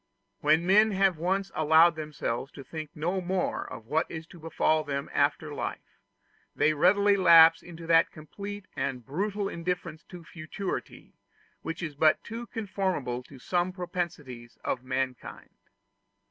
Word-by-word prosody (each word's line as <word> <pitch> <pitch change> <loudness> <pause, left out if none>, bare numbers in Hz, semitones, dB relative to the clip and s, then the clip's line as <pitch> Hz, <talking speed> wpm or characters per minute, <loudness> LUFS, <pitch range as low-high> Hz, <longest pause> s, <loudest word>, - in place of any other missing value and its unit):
When 155 +3 +3
men 210 +3 +5
have 190 -4 +2
once 190 +3 -1
allowed 160 +2 +5
themselves 150 -4 -4
to 140 - -10
think 155 +2 -7
no 175 +5 -1
more 185 +1 -2
of 115 - -9
what 155 +7 0
is 160 -1 -7
to 175 - -13
befall 155 -1 +1
them 140 -1 -4
after - - 0
life, - - -6 0.6
they 155 - +3
readily 200 +6 +4
lapse 165 -3 +7
into 170 -1 -11
that 165 0 +4
complete 200 +6 -8
and 125 -4 -3
brutal 200 +7 -2
indifference 170 -2 -4
to 175 -2 -11
futurity, 170 +5 -6 0.5
which 165 +2 -5
is 155 -3 -4
but 155 +2 +3
too 230 +2 -7
conformable 190 - -2
to 135 +2 -15
some 175 +7 -1
propensities 170 -10 -6
of 125 - -2
mankind. 130 0 -4
165 Hz, 145 wpm, -28 LUFS, 150-185 Hz, 0.6 s, lapse